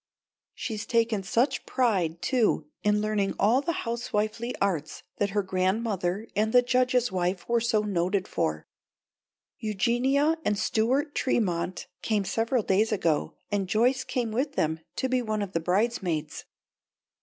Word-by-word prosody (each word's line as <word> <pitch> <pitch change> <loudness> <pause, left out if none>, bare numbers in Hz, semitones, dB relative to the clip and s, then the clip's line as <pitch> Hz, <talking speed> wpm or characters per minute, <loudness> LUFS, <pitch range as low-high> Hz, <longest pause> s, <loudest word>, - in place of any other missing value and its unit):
She's 215 -3 -4
taken 230 -3 +2
such 230 +8 +1
pride 185 -10 0
too 245 -5 +2 0.2
in 210 0 +2
learning 210 -2 0
all 235 +6 +3
the 335 +2 -3
housewifely 230 0 -2
arts 170 -7 -1
that 205 - +1
her 205 0 0
grandmother 190 +1 -1
and 215 +2 +1
the 245 +1 +6
Judge's 250 -1 +2
wife 180 0 -1
were 235 0 +3
so 225 -2 +2
noted 190 -1 0
for. 80 0 -2 0.9
Eugenia 250 +8 +1
and 210 - +1
Stuart 250 +8 +1
Tremont 185 -8 0 0.2
came 210 -3 0
several 230 +3 0
days 205 +4 +2
ago, 165 -7 0 0.2
and 195 -2 -1
Joyce 245 +6 +2
came 240 -3 -2
with 270 +6 -1
them 160 +1 0 0.2
to 260 - 0
be 255 -1 +1
one 215 -3 -1
of 195 - -6
the 170 - 0
bridesmaids. 180 -4 -1
215 Hz, 145 wpm, -27 LUFS, 190-240 Hz, 0.9 s, the